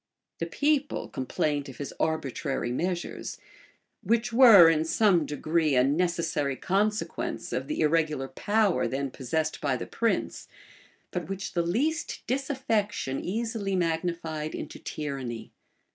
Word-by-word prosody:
The -, -, -2 dB
people 290 Hz, -1 st, 0 dB
complained 145 Hz, +2 st, -2 dB
of 130 Hz, -, -10 dB
his 145 Hz, -, -6 dB
arbitrary 140 Hz, -5 st, -1 dB
measures; 175 Hz, +6 st, -3 dB, 0.6 s
which 230 Hz, +1 st, +1 dB
were, 230 Hz, -9 st, +9 dB
in 160 Hz, -1 st, +3 dB
some 175 Hz, -1 st, +3 dB
degree, 155 Hz, 0 st, +1 dB
a 125 Hz, -, +5 dB
necessary 160 Hz, -1 st, 0 dB
consequence 210 Hz, -, -1 dB
of -, -, -2 dB
the 305 Hz, -, -2 dB
irregular 155 Hz, -3 st, +1 dB
power 205 Hz, +7 st, +1 dB
then 135 Hz, 0 st, -2 dB
possessed 155 Hz, +6 st, -2 dB
by 135 Hz, -3 st, +1 dB
the -, -, -5 dB
prince, 230 Hz, -1 st, -1 dB, 0.6 s
but 175 Hz, -2 st, -4 dB
which 195 Hz, +1 st, -4 dB
the 175 Hz, -, +2 dB
least 275 Hz, -, -1 dB
disaffection 230 Hz, -, -1 dB
easily 220 Hz, -1 st, -2 dB
magnified 165 Hz, -2 st, -2 dB
into 155 Hz, -, -7 dB
tyranny. 135 Hz, -6 st, -5 dB
165 Hz, 125 wpm, -28 LUFS, 145-210 Hz, 0.6 s, were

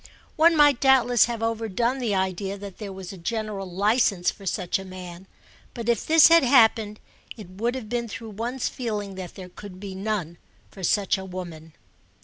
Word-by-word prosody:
One 330 Hz, +1 st, +5 dB
might 290 Hz, -4 st, +5 dB
doubtless 250 Hz, -4 st, +5 dB
have 230 Hz, -1 st, -4 dB
overdone 230 Hz, +3 st, -1 dB
the 225 Hz, -5 st, -1 dB
idea 190 Hz, +1 st, -2 dB
that 200 Hz, -2 st, -10 dB
there 205 Hz, -3 st, -6 dB
was 190 Hz, 0 st, -8 dB
a 190 Hz, -, -11 dB
general 210 Hz, 0 st, -4 dB
licence 200 Hz, -1 st, +2 dB
for 195 Hz, -, -12 dB
such 185 Hz, 0 st, -1 dB
a -, -, -7 dB
man; 185 Hz, -1 st, -10 dB, 0.5 s
but 235 Hz, -1 st, -6 dB
if 235 Hz, -3 st, 0 dB
this 320 Hz, -1 st, +8 dB
had 335 Hz, 0 st, +7 dB
happened 225 Hz, -5 st, +4 dB, 0.4 s
it 210 Hz, -5 st, -10 dB
would 230 Hz, +6 st, -2 dB
have 250 Hz, -5 st, -6 dB
been 235 Hz, +1 st, -2 dB
through 225 Hz, +1 st, -8 dB
one's 235 Hz, +5 st, -3 dB
feeling 210 Hz, -5 st, -4 dB
that 185 Hz, -2 st, -8 dB
there 185 Hz, -1 st, -9 dB
could 185 Hz, 0 st, -11 dB
be 195 Hz, -1 st, -7 dB
none 190 Hz, -4 st, -3 dB, 0.3 s
for 195 Hz, -, -12 dB
such 195 Hz, +2 st, +1 dB
a -, -, -7 dB
woman. 170 Hz, -4 st, -8 dB
205 Hz, 185 wpm, -25 LUFS, 190-235 Hz, 0.5 s, this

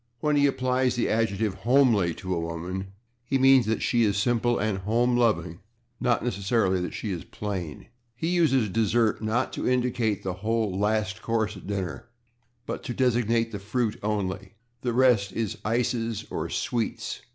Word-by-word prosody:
When 150 Hz, +4 st, +1 dB
he 145 Hz, 0 st, +5 dB
applies 130 Hz, -1 st, +1 dB
the 120 Hz, -, 0 dB
adjective 110 Hz, -3 st, 0 dB
/homely/ 115 Hz, -8 st, +3 dB
to 95 Hz, -1 st, -3 dB
a 85 Hz, -, -1 dB
woman 85 Hz, +3 st, -4 dB, 0.4 s
he 135 Hz, +3 st, 0 dB
means 135 Hz, -3 st, +5 dB
that 110 Hz, -, 0 dB
she 120 Hz, -1 st, +2 dB
is 100 Hz, -2 st, +2 dB
simple 120 Hz, +3 st, +1 dB
and 105 Hz, -2 st, -1 dB
home 120 Hz, +5 st, +1 dB
loving, 105 Hz, -8 st, +1 dB, 0.4 s
not 120 Hz, -2 st, +1 dB
necessarily 100 Hz, -3 st, +1 dB
that 90 Hz, -, -4 dB
she 105 Hz, -, -4 dB
is 85 Hz, -4 st, -4 dB
plain. 95 Hz, -8 st, -5 dB, 0.3 s
He 160 Hz, +7 st, -2 dB
uses 155 Hz, -10 st, +3 dB
/dessert/, 110 Hz, +2 st, +1 dB
not 110 Hz, +2 st, 0 dB
to -, -, -1 dB
indicate 125 Hz, -4 st, 0 dB
the 95 Hz, -, -2 dB
whole 110 Hz, -3 st, 0 dB
last 105 Hz, +1 st, 0 dB
course 110 Hz, -2 st, -1 dB
at 95 Hz, -, -11 dB
dinner, 95 Hz, -2 st, -4 dB, 0.6 s
but -, -, -4 dB
to 120 Hz, -, -4 dB
designate 115 Hz, -2 st, +1 dB
the 105 Hz, -, -5 dB
fruit 105 Hz, +2 st, -2 dB
only; 100 Hz, -1 st, -3 dB, 0.3 s
the 125 Hz, -, -1 dB
rest 120 Hz, -6 st, +3 dB
is 110 Hz, 0 st, -2 dB
/ices/ 115 Hz, 0 st, -1 dB
or -, -, -2 dB
/sweets 115 Hz, -3 st, -2 dB
110 Hz, 165 wpm, -26 LUFS, 100-120 Hz, 0.6 s, he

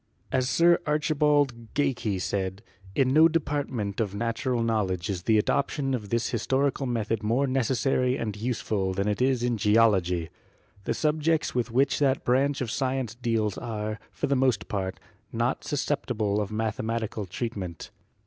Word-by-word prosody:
As 130 Hz, 0 st, +1 dB
Sir 170 Hz, 0 st, +5 dB
Archibald 145 Hz, -5 st, +1 dB
Geikie 125 Hz, -8 st, 0 dB
said: 95 Hz, +1 st, -2 dB, 0.3 s
"In 130 Hz, -1 st, +3 dB
no 160 Hz, +2 st, +7 dB
department 145 Hz, -10 st, -2 dB
of 100 Hz, -3 st, -1 dB
natu 115 Hz, +3 st, -2 dB
ral 120 Hz, -2 st, +1 dB
knowledge 100 Hz, -5 st, 0 dB
is 90 Hz, -3 st, -3 dB
the 110 Hz, +4 st, +3 dB
adoption 135 Hz, +4 st, 0 dB
of 105 Hz, -5 st, -3 dB
this 115 Hz, +1 st, 0 dB
historical 135 Hz, +3 st, 0 dB
method 115 Hz, -2 st, -1 dB
more 115 Hz, +6 st, +1 dB
necessary 130 Hz, 0 st, +1 dB
and 105 Hz, -3 st, -3 dB
useful 105 Hz, -4 st, -2 dB
than 100 Hz, +2 st, 0 dB
it 105 Hz, +2 st, -1 dB
is 130 Hz, -2 st, +2 dB
in 120 Hz, -1 st, +1 dB
Geology. 100 Hz, -6 st, +3 dB, 0.5 s
The -, -, 0 dB
sub 155 Hz, 0 st, 0 dB
jects 160 Hz, +1 st, +1 dB
with 125 Hz, -1 st, 0 dB
which 135 Hz, +6 st, +2 dB
that 135 Hz, -2 st, +2 dB
branch 135 Hz, +3 st, +2 dB
of 120 Hz, -4 st, -2 dB
science 130 Hz, -3 st, -1 dB
deals 115 Hz, -4 st, -1 dB
are, 110 Hz, -2 st, -4 dB
for -, -, -3 dB
the 140 Hz, -, +1 dB
most 125 Hz, -8 st, +1 dB
part, 95 Hz, -2 st, -3 dB, 0.3 s
not -, -, -1 dB
susceptible 105 Hz, -1 st, -1 dB
of 105 Hz, -, -4 dB
mathematical 110 Hz, -1 st, -2 dB
treatment. 95 Hz, -4 st, -5 dB
115 Hz, 160 wpm, -27 LUFS, 105-135 Hz, 0.5 s, no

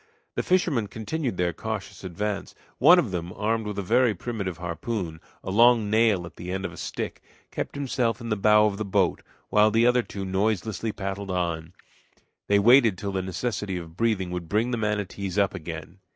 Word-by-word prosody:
The -, -, -1 dB
fishermen 165 Hz, -, +1 dB
continued 110 Hz, -, -3 dB
their 90 Hz, -1 st, +1 dB
cautious 110 Hz, +3 st, -5 dB
advance. 100 Hz, +3 st, -4 dB, 0.2 s
One -, -, +8 dB
of -, -, +1 dB
them, 90 Hz, -1 st, -3 dB
armed 110 Hz, +1 st, -1 dB
with 105 Hz, -1 st, -4 dB
a 100 Hz, -, -1 dB
very 115 Hz, +3 st, +3 dB
primitive 100 Hz, -3 st, -4 dB
harpoon 85 Hz, 0 st, -4 dB, 0.2 s
a -, -, -4 dB
long 115 Hz, 0 st, +5 dB
nail 110 Hz, -5 st, +3 dB
at 85 Hz, -, -12 dB
the 90 Hz, +1 st, -6 dB
end 95 Hz, +1 st, -3 dB
of -, -, -5 dB
a -, -, -12 dB
stick -, -, -5 dB, 0.3 s
kept -, -, -4 dB
himself 125 Hz, -4 st, -1 dB
in 115 Hz, -, -6 dB
the 105 Hz, -, +1 dB
bow 105 Hz, +1 st, +5 dB
of 100 Hz, -2 st, 0 dB
the 110 Hz, -, -2 dB
boat, 100 Hz, -2 st, +1 dB, 0.3 s
while 105 Hz, +1 st, +5 dB
the 115 Hz, +2 st, +3 dB
other 125 Hz, 0 st, +4 dB
two 100 Hz, -4 st, -6 dB
noiselessly 105 Hz, +3 st, -1 dB
paddled 100 Hz, 0 st, -4 dB
on. 85 Hz, -2 st, -2 dB, 0.7 s
They 100 Hz, -, +4 dB
waited 115 Hz, -1 st, +6 dB
till 100 Hz, +1 st, -4 dB
the 95 Hz, -1 st, -1 dB
necessity 95 Hz, 0 st, -3 dB
of 85 Hz, -2 st, -8 dB
breathing 100 Hz, -4 st, 0 dB
would 90 Hz, -2 st, -5 dB
bring 110 Hz, +4 st, +1 dB
the 120 Hz, -, 0 dB
manatees 100 Hz, -3 st, -2 dB
up 100 Hz, -1 st, +3 dB
again. 80 Hz, 0 st, -7 dB
100 Hz, 195 wpm, -26 LUFS, 90-110 Hz, 0.7 s, One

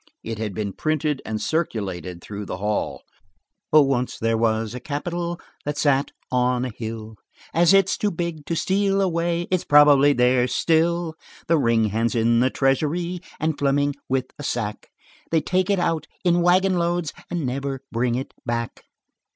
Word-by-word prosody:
It 115 Hz, -1 st, -5 dB
had 105 Hz, -4 st, -3 dB
been 100 Hz, -1 st, -3 dB
printed 155 Hz, -, -1 dB
and 110 Hz, 0 st, -2 dB
circulated 95 Hz, -, -3 dB
through 105 Hz, -1 st, -7 dB
the 90 Hz, -, -4 dB
hall. 105 Hz, +2 st, -2 dB, 0.7 s
"Oh, 155 Hz, -1 st, +7 dB
once 130 Hz, -2 st, -1 dB
there 115 Hz, 0 st, +1 dB
was 110 Hz, -1 st, 0 dB
a 125 Hz, -, -5 dB
capitol 170 Hz, +5 st, -3 dB, 0.2 s
That 145 Hz, 0 st, -3 dB
sat 140 Hz, -2 st, +2 dB, 0.2 s
on 125 Hz, 0 st, +1 dB
a 125 Hz, -, -4 dB
hill, 110 Hz, -1 st, -6 dB, 0.4 s
As 170 Hz, 0 st, +5 dB
it's 195 Hz, -1 st, +4 dB
too 210 Hz, -, +1 dB
big 170 Hz, -4 st, -4 dB
to 165 Hz, -, -1 dB
steal 195 Hz, +3 st, +1 dB
away 170 Hz, -2 st, 0 dB
It's 185 Hz, -2 st, +1 dB
probably 145 Hz, -1 st, +6 dB
there 125 Hz, -1 st, +3 dB
still. 165 Hz, +3 st, +1 dB, 0.3 s
The 165 Hz, -1 st, +3 dB
ring's 115 Hz, -4 st, +2 dB
hand 115 Hz, +3 st, 0 dB
in 115 Hz, 0 st, +3 dB
the 130 Hz, +2 st, +3 dB
treasury 155 Hz, +7 st, 0 dB, 0.2 s
And 155 Hz, -1 st, -1 dB
Fleming 145 Hz, 0 st, +2 dB, 0.2 s
with 130 Hz, -1 st, +1 dB
a -, -, -6 dB
sack. 105 Hz, -6 st, -3 dB, 0.4 s
They 165 Hz, -, +3 dB
take 185 Hz, +5 st, 0 dB
it 200 Hz, -, +3 dB
out 165 Hz, -3 st, 0 dB, 0.2 s
in 175 Hz, -1 st, +3 dB
wagon 185 Hz, +1 st, +3 dB
loads 170 Hz, -2 st, -1 dB, 0.2 s
And 170 Hz, -5 st, -2 dB
never 135 Hz, +1 st, -3 dB
bring 120 Hz, +1 st, 0 dB
it 130 Hz, +2 st, -4 dB
back." 115 Hz, -1 st, -3 dB
140 Hz, 165 wpm, -23 LUFS, 115-170 Hz, 0.7 s, Oh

